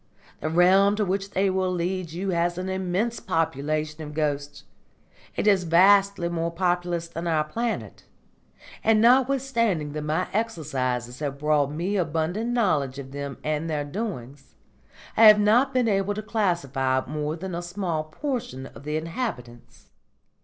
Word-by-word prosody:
The 155 - -2
realm 190 +4 +5
to 210 -1 0
which 195 +1 -2
they 195 0 +1
will 185 0 0
lead 180 -1 -2
you 185 +4 -3
has 175 0 0
an 185 +1 -3
immense 190 +5 -1
population 155 0 -2
of 150 0 -8
ghosts; 145 -2 -2 0.7
it - - -1
is 200 -3 +4
vastly 195 +2 +4
more 170 -1 -1
populous 175 -1 -1
than 165 +1 -5
our 160 -2 +2
planet; 230 +9 -4 0.8
and 220 0 +4
notwithstanding 240 - +2
that 150 +1 -4
my 155 +4 -1
exercises 130 - -2
have 140 -2 -3
brought 150 -1 +2
me 175 +7 -2
abundant 175 +6 -1
knowledge 155 - +1
of 135 -1 -8
them 140 -1 -5
and 155 +2 -2
their 150 -2 -1
doings, 145 - -6 0.6
I 225 - +7
have 210 -1 +9
not 235 +6 +4
been 255 -3 +1
able 200 -1 +1
to 215 - -4
classify 140 - 0
more 150 +1 -3
than 185 +2 -6
a 170 - -3
small 175 -3 -3
portion 155 - -4
of - - -12
the 150 +1 -1
inhabitants. 155 - -6
175 Hz, 155 wpm, -25 LUFS, 150-200 Hz, 0.8 s, have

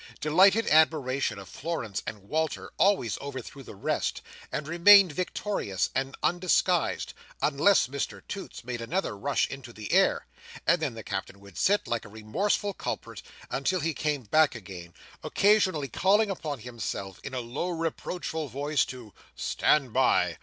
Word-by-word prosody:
Delighted 195 +8 +4
admiration 140 -7 +3
of 100 -1 -9
Florence 115 - -4
and 105 -3 -6
Walter 155 +9 -2
always 190 - +2
overthrew 140 0 -7
the 125 - -11
rest, 100 - -2 0.3
and 150 - -3
remained 185 +3 +7
victorious 160 - -2
and 135 +1 -2
undisguised, 175 0 +1 0.3
unless 150 +7 +4
Mr 140 +3 -4
Toots 200 -9 -7
made 120 -1 -5
another 170 - -2
rush 135 +8 0
into 135 -3 -8
the 110 -3 -6
air, - - +3 0.4
and 170 0 +3
then 140 -7 -2
the 110 - -8
Captain 95 +1 -5
would 100 -2 -15
sit, 205 +1 +2
like 120 -1 -1
a - - -11
remorseful 185 - -1
culprit, - - -5 0.3
until 180 +7 0
he 165 +1 -1
came 150 -2 -2
back 150 +6 +3
again, 90 -6 -10 0.3
occasionally 190 -8 +3
calling 200 - +2
upon 150 - -5
himself, 110 -5 -5
in 135 - -6
a - - -1
low 125 +9 -4
reproachful 165 -1 -3
voice, 140 +3 0
to 120 -5 -10 0.2
"Stand 135 -6 +1
by!" 130 0 +2
140 Hz, 150 wpm, -28 LUFS, 115-175 Hz, 0.4 s, remained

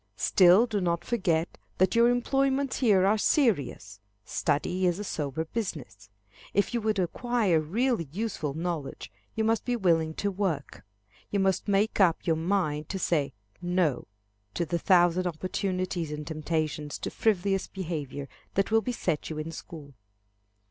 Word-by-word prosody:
Still 185 +4 +6
do 215 -4 -2
not 170 -1 -1
forget 175 -8 0 0.2
that 185 0 +3
your 235 0 +5
employments 270 +2 +1
here 205 -7 +4
are 210 +2 +3
serious. 145 - +1 0.3
Study 175 +7 0
is 175 0 +1
a 205 - -4
sober 155 -4 -3
business. 150 - -5 0.5
If 200 +4 +2
you 235 - 0
would 215 -1 0
acquire 200 -1 +1
really 220 - 0
useful 180 -7 -3
knowledge, 165 -3 -4 0.2
you 220 - 0
must 225 0 +1
be 245 - -1
willing 165 -7 +1
to 200 - -1
work. 185 -8 -3 0.5
You 200 - 0
must 190 0 +1
make 205 +2 +1
up 175 -4 +3
your 165 - +2
mind 160 -3 -1
to 195 - -2
say 145 -7 0 0.3
"no" 175 -6 0 0.5
to 170 - 0
the 170 +1 -1
thousand 180 0 +4
opportunities 180 0 -2
and 150 0 -5
temptations 155 -1 -2
to - - -5
frivolous 195 -2 +1
behavior 155 -7 -5 0.3
that 195 +2 +1
will 225 0 +4
beset 190 -9 -2
you 155 - -5
in 155 +1 -4
school. 155 -4 -10
180 Hz, 150 wpm, -28 LUFS, 160-205 Hz, 0.5 s, Still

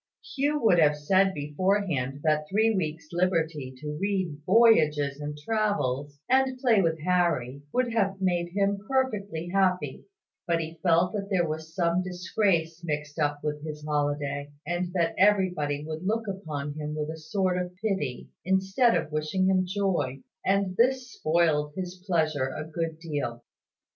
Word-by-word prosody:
Hugh 290 +2 +1
would 185 -6 +5
have 150 -2 +4
said 190 +6 +3
beforehand 150 -3 -1
that 155 -1 +1
three 220 +3 +3
weeks' 160 -5 -3
liberty 165 -6 0
to 150 +2 -5
read 190 -7 -1
voyages 155 -10 +4
and 150 0 -5
travels, 145 - -1
and 260 0 +3
play 240 -6 +4
with 165 -2 0
Harry, 165 -7 +1
would 250 -2 0
have 195 -4 +1
made 175 -2 0
him 200 0 +1
perfectly 205 -11 -1
happy; 180 -7 0 0.4
but 170 -1 +2
he 160 0 -6
felt 175 +1 +3
that 200 -2 -3
there 180 -4 +2
was 160 +1 -6
some 175 -1 +2
disgrace 180 -2 0
mixed 150 -1 -4
up 145 -1 0
with 150 0 -3
his 150 -1 -6
holiday, 145 -1 -1 0.2
and 175 +2 -2
that 170 -3 +1
everybody 180 -8 +2
would 155 +2 -5
look 220 +3 -1
upon 155 -7 -4
him 150 0 -5
with 155 0 -3
a 160 - -7
sort 180 +2 0
of 180 0 -6
pity, 185 - -2 0.2
instead 190 +6 +3
of 160 -2 -4
wishing 155 +5 0
him 185 -1 +2
joy; 180 -9 -1 0.2
and 195 -1 +1
this 255 0 +2
spoiled 155 -2 +1
his 185 -1 -6
pleasure 155 -6 +1
a 135 +3 -5
good 160 0 -4
deal. 145 -8 -4
170 Hz, 155 wpm, -27 LUFS, 150-195 Hz, 0.4 s, would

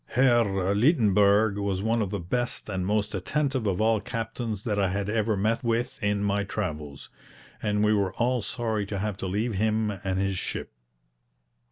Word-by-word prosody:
Herr 120 -2 +5 0.3
Leitenberg 105 - +4
was 100 -1 -1
one 115 +1 +1
of 100 - -1
the 100 0 -3
best 120 +7 -2
and 95 -2 -2
most 105 +1 0
attentive 130 +5 -1
of 95 -2 0
all 110 -1 +3
captains 115 -3 -4
that 105 -3 -1
I 95 -2 +2
had 100 +1 -2
ever 110 -1 +1
met 110 +6 0
with 120 +3 -1
in 105 -1 0
my 100 0 +1
travels, 75 -9 -5 0.5
and 105 -1 +1
we 105 0 +4
were 100 -2 +1
all 125 0 +1
sorry 110 -2 -2
to 100 - -3
have 105 +1 -2
to 95 - -4
leave 105 +5 -1
him 110 +1 +1
and 95 -1 -3
his 95 -1 0
ship. - - -4
105 Hz, 180 wpm, -27 LUFS, 100-115 Hz, 0.5 s, Herr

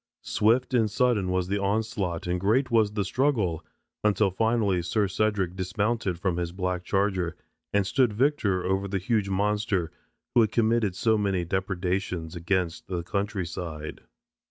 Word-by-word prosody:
Swift 120 +5 +2
and 115 -3 +3
sudden 110 -4 +1
was 90 -1 0
the 100 +2 0
onslaught 100 -4 -1
and 90 0 -1
great 120 +7 +2
was 110 -3 +3
the 105 -2 -1
struggle, 105 - 0 0.4
until 105 -1 +3
finally 110 -3 +1
Sir 105 +3 0
Cedric 95 -2 0
dismounted 100 0 -1
from 90 -1 -1
his 85 -1 -2
black 90 -1 -2
charger 95 -3 0 0.4
and 100 -1 +2
stood 125 +3 +2
victor 105 -6 +1
over 95 +1 0
the 100 0 -1
huge 100 +1 0
monster 100 -3 0 0.4
who 120 - +6
had 110 -2 +2
committed 110 -4 +2
so 110 +2 +2
many 95 -4 0
depredations 90 -2 -2
against 85 0 -1
the 90 -2 -3
country 100 +1 -2
side." 80 -2 -6
100 Hz, 155 wpm, -27 LUFS, 90-110 Hz, 0.4 s, who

